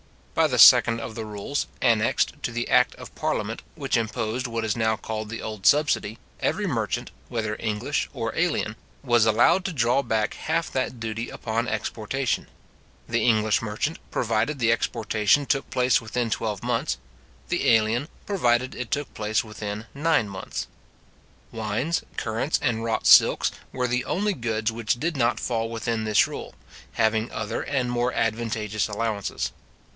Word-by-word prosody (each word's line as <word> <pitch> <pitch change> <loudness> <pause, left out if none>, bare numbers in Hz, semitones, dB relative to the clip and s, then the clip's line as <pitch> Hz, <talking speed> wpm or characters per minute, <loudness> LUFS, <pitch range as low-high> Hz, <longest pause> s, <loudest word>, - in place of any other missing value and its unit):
By - - +4
the - - -1
second 115 0 +8
of 115 - -6
the 110 -1 -5
rules, 105 +7 -3
annexed 115 -3 +2
to - - -2
the 120 0 -3
act 125 0 +4
of - - -11
parliament, - - -2
which - - -1
imposed 115 +2 -1
what 115 -1 -2
is 105 - 0
now 110 -1 +1
called 110 0 -5
the 115 - -6
old 110 -3 -2
subsidy, 145 -7 +3 0.2
every - - 0
merchant, - - -2 0.2
whether 110 -2 -2
English 110 +6 -1
or 115 -4 -3
alien. 160 -10 0 0.3
was 120 -4 +4
allowed 165 - +4
to 190 - -2
draw 125 0 +2
back 110 -4 0
half 165 +1 -2
that 130 -2 -2
duty 115 +1 -4
upon 115 +2 -2
exportation; 125 +2 -2 0.6
the 115 -1 0
English 110 -3 +3
merchant, 115 +8 -2
provided 115 +5 0
the 115 -3 +3
exportation 115 +3 +1
took 135 0 0
place 125 0 +2
within 115 +1 -2
twelve 105 -4 -2
months; - - 0 0.5
the - - +1
alien, 115 +4 +3 0.2
provided 125 - +1
it 125 -2 -5
took 145 -1 -2
place 105 0 0
within 105 0 -6
nine 150 -6 +2
months. 95 -2 -5 0.9
Wines, 115 +9 -1 0.2
currants, 115 +8 0
and 115 -5 0
wrought 115 -1 -1
silks, - - +6 0.2
were 125 -1 -1
the 125 +1 -1
only 205 +3 0
goods 110 - -1
which 115 +1 -1
did 165 +3 -1
not 120 -2 +1
fall 115 -2 -1
within 115 -1 -2
this 110 -1 +4
rule, - - -7 0.4
having 110 0 +1
other 110 0 -3
and 130 -4 -1
more 120 +1 +1
advantageous 110 -2 -1
allowances. 105 -1 -2
115 Hz, 160 wpm, -25 LUFS, 110-125 Hz, 0.9 s, second